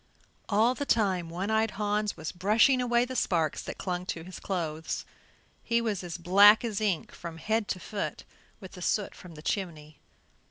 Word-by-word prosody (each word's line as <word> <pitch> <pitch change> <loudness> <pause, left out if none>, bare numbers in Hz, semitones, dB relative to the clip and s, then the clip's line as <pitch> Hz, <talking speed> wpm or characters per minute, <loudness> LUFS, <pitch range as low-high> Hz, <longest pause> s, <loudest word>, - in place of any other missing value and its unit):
All 220 +4 +4
the 285 - -4
time 190 -10 +1
One 185 +5 -3
eyed 220 0 +2
Hans 210 -1 0
was 160 -1 -5
brushing 220 +8 +3
away 240 0 +2
the 260 +1 -6
sparks 165 - +1
that - - -7
clung 180 -1 -3
to 165 - -4
his 185 +2 -9
clothes. 160 -4 -3 0.6
He 235 0 +2
was 215 -5 -2
as 175 -1 -5
black 200 +6 +6
as 220 -2 -2
ink 195 -6 0
from 170 -1 -8
head 220 +4 0
to 185 - -2
foot 205 +2 -4 0.4
with 190 -3 -10
the 180 - -11
soot 205 +3 0
from 180 -3 -12
the 150 - -11
chimney. 155 -7 -4
195 Hz, 185 wpm, -29 LUFS, 170-220 Hz, 0.6 s, black